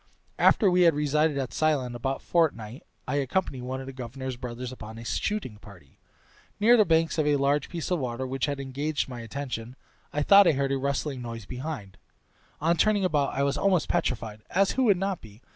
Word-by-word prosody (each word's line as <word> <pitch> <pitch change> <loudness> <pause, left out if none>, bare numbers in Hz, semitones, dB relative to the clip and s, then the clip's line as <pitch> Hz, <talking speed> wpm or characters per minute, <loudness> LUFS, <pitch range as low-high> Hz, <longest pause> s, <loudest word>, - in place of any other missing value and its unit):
After 210 - +5
we 180 0 +3
had 165 -3 +5
resided 150 0 +1
at 135 -2 -3
Ceylon 145 -6 +1
about 135 +3 -3
a - - -27
fortnight 135 -8 0 0.3
I 135 +3 0
accompanied 140 -1 -1
one 130 +1 -4
of - - -8
the 135 - -8
governor's 130 +1 -6
brothers 125 0 -6
upon 110 -3 -9
a 115 - -9
shooting 200 - -2
party. 95 -10 -16 0.6
Near 230 +4 +6
the 215 -3 +5
banks 165 -1 +2
of 150 - +2
a 145 - +4
large 140 +1 +1
piece 170 0 -5
of 180 - +2
water, 125 -1 -3
which 130 +1 -2
had 140 -1 -3
engaged 140 +3 -2
my 125 -2 -7
attention, 120 0 -6 0.4
I 150 - 0
thought 200 +3 +7
I - - +5
heard 135 0 0
a 135 - +1
rustling 140 0 -2
noise 115 -3 -7
behind; 125 -6 -6 0.6
on 165 +2 +2
turning 205 +2 +3
about 145 -6 +1
I 140 - +1
was 140 +1 0
almost 185 -5 +2
petrified 110 -3 -1
(as 195 +2 +2
who 265 - +1
would 200 -5 +4
not 195 -1 -2
be?) 110 +2 -15
140 Hz, 210 wpm, -27 LUFS, 125-160 Hz, 0.6 s, thought